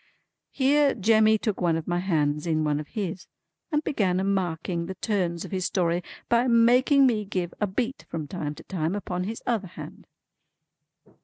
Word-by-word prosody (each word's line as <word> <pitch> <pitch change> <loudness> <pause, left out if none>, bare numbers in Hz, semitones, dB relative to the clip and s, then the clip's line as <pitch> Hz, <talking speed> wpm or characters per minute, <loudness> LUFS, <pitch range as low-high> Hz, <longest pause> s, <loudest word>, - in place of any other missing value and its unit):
Here 280 +1 +3
Jemmy 220 +1 +4
took 210 -2 -2
one 170 -2 +2
of 160 - -6
my 175 0 0
hands 150 -4 0
in 155 -1 +1
one 150 -1 0
of 150 - -7
his, 190 -5 -5 0.4
and 300 0 +1
began 190 -11 0
a - - 0
marking 175 -3 -1
the 190 - -5
turns 180 -6 -1
of - - -10
his 185 -2 -1
story 175 -2 +1 0.3
by 235 +2 +3
making 250 +4 +5
me 225 -5 +2
give 185 -3 -3
a 210 - +2
beat 235 +7 -3
from 155 -3 -4
time 150 -3 -4
to - - -12
time 175 -1 -2
upon 180 -3 -3
his 225 +3 -5
other 225 -5 -1
hand. 175 - -11
190 Hz, 180 wpm, -26 LUFS, 170-225 Hz, 0.4 s, making